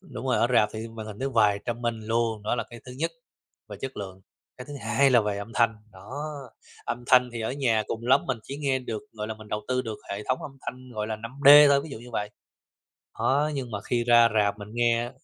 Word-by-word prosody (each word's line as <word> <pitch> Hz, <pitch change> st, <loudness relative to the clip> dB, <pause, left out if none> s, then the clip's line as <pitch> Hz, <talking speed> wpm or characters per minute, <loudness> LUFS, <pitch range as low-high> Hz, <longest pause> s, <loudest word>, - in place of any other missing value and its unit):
Đúng 135 Hz, -9 st, -8 dB
rồi, 130 Hz, -, +2 dB
ở 115 Hz, -, +4 dB
rạp 105 Hz, -3 st, +5 dB
thì 110 Hz, +1 st, -5 dB
màn 110 Hz, -1 st, -8 dB
hình 105 Hz, -1 st, -8 dB
nó 135 Hz, +1 st, -1 dB
vài 105 Hz, -4 st, +3 dB
trăm 120 Hz, 0 st, -4 dB
inch 110 Hz, -2 st, -3 dB
luôn, 115 Hz, -2 st, 0 dB
đó 110 Hz, -, 0 dB
là 115 Hz, -2 st, -2 dB
cái 120 Hz, -1 st, -10 dB
thứ 125 Hz, -, -9 dB
nhất, 165 Hz, +6 st, -2 dB, 0.6 s
về 105 Hz, -, -8 dB
chất 135 Hz, 0 st, -5 dB
lượng. 95 Hz, -2 st, -7 dB, 0.4 s
Cái 125 Hz, -, -8 dB
thứ 145 Hz, -, -10 dB
hai 140 Hz, -1 st, +3 dB
là 120 Hz, -2 st, +6 dB
về 105 Hz, -1 st, -2 dB
âm 110 Hz, +3 st, -7 dB
thanh, 115 Hz, -2 st, +3 dB, 0.2 s
đó, 95 Hz, +4 st, -14 dB, 0.7 s
âm 120 Hz, +1 st, -4 dB
thanh 125 Hz, -1 st, +5 dB
thì 115 Hz, -, -5 dB
ở 110 Hz, -, -2 dB
nhà 120 Hz, -6 st, +1 dB
cùng 115 Hz, +1 st, -5 dB
lắm 135 Hz, +2 st, +5 dB
mình 130 Hz, -4 st, -1 dB
chỉ 140 Hz, -, -7 dB
nghe 135 Hz, -3 st, 0 dB
được, 115 Hz, -4 st, -5 dB
gọi 105 Hz, -1 st, -5 dB
là, 110 Hz, -, -4 dB
mình 110 Hz, -1 st, -13 dB
đầu 105 Hz, -, -2 dB
tư 130 Hz, 0 st, +1 dB
được 110 Hz, -3 st, -5 dB
hệ 100 Hz, +1 st, -4 dB
thống 130 Hz, -, 0 dB
âm 135 Hz, -1 st, -8 dB
thanh, 130 Hz, 0 st, -8 dB
gọi 105 Hz, 0 st, -2 dB
là, 110 Hz, -1 st, -3 dB
5D 140 Hz, +6 st, +7 dB
thôi, 140 Hz, 0 st, +4 dB
ví 155 Hz, -, -9 dB
dụ 125 Hz, -, -7 dB
như 120 Hz, +1 st, -12 dB
vậy. 105 Hz, -2 st, -3 dB, 0.9 s
Đó, 145 Hz, +3 st, +2 dB
nhưng 130 Hz, -3 st, -4 dB
mà 100 Hz, -1 st, -4 dB
khi 120 Hz, -1 st, -1 dB
ra 120 Hz, -1 st, +6 dB
rạp 105 Hz, -1 st, +2 dB
mình 100 Hz, 0 st, -9 dB
nghe 120 Hz, 0 st, +1 dB
115 Hz, 255 wpm, -26 LUFS, 110-130 Hz, 0.9 s, 5D